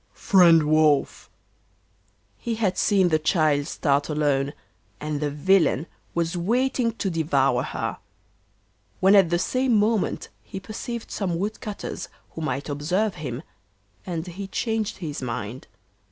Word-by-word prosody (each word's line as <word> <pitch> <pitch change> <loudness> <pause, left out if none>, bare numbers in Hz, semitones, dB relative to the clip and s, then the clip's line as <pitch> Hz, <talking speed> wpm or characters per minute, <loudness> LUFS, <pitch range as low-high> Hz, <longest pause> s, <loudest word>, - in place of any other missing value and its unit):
'Friend 175 -6 +5
Wolf.' 155 -1 +2 1.1
He 235 -2 -2
had 205 -5 0
seen 195 -4 +3
the 155 -1 +2
child 155 -3 +2
start 145 -2 0
alone, 145 -2 +1 0.5
and 150 -1 -3
the 150 0 -1
villain 160 -1 +2 0.3
was 170 0 0
waiting 235 +6 +1
to 200 -4 -2
devour 140 -6 +2
her; - - -4 1.0
when 190 +2 +5
at 195 -4 +6
the 175 - +2
same 255 +6 +1
moment 210 0 0
he 195 - -8
perceived 225 +3 -6
some 180 -5 -1
wood 205 +4 -3
cutters 210 -2 -6 0.2
who 165 - -7
might 145 -2 -2
observe 180 +9 0
him, 135 -3 -6 0.6
and 170 -3 -4
he 190 +2 -7
changed 220 +1 -2
his 155 -7 -5
mind. 115 0 -5
170 Hz, 135 wpm, -24 LUFS, 150-205 Hz, 1.1 s, at